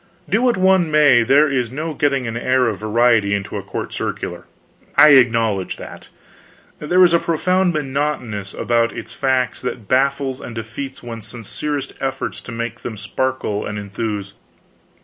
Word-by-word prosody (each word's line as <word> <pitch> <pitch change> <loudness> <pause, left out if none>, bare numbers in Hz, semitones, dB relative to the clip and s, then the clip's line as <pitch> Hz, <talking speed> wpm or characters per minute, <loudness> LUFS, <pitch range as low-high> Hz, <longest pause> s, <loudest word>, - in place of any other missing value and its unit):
Do 220 - +1
what 245 -4 +2
one 185 -2 +3
may, 150 -5 +5
there 140 +6 +4
is 130 -4 -1
no 155 +4 -4
getting 140 -3 0
an 115 0 -4
air 130 +2 +2
of 105 -5 -2
variety 110 -2 +2
into 100 -1 -5
a - - -3
court - - -6
circular, - - -4 0.5
I 150 - +9
acknowledge 115 -8 +3
that. - - -10 0.7
There 180 +5 +4
is 175 -2 +5
a 170 - +5
profound 180 +3 +1
monotonousness 135 -8 -3
about 115 -1 +1
its - - -7
facts 130 -3 0
that 125 -4 -5
baffles 135 +1 +1
and 120 - -8
defeats 120 +5 -7
one's 115 -2 -7
sincerest 120 +6 -4
efforts 135 -1 -3
to - - -10
make 115 0 -4
them 110 -3 -6
sparkle 110 0 -2
and 105 - -5
enthuse. 100 0 -4
125 Hz, 160 wpm, -19 LUFS, 115-145 Hz, 0.7 s, I